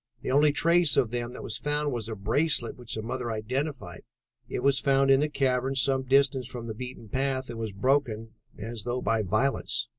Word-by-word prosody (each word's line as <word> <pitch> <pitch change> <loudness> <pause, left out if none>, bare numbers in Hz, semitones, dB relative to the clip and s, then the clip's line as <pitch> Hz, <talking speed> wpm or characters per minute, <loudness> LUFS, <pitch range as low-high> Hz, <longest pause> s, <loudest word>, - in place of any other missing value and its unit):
The - - -2
only 145 +2 +5
trace 170 +1 +4
of 115 - +2
them 120 0 -3
that - - -8
was 110 - -3
found 150 0 -1
was 115 -2 -3
a 110 - -4
bracelet 120 +5 +1
which 120 -2 -5
the 110 - -4
mother 120 +1 -4
identified. 130 +7 -4 0.5
It - - -3
was 140 0 +3
found 135 -1 +3
in 135 - +6
the 150 +1 +1
cavern 135 -2 0
some 135 0 +2
distance 135 -1 +2
from 120 -2 -7
the 110 - -5
beaten 125 0 -8
path 130 +2 -2
and 115 - -7
was 110 -2 -3
broken, 115 0 0 0.3
as 110 0 -4
though 125 +2 -3
by 115 -1 +1
violence. 115 +3 0
125 Hz, 205 wpm, -27 LUFS, 115-135 Hz, 0.5 s, in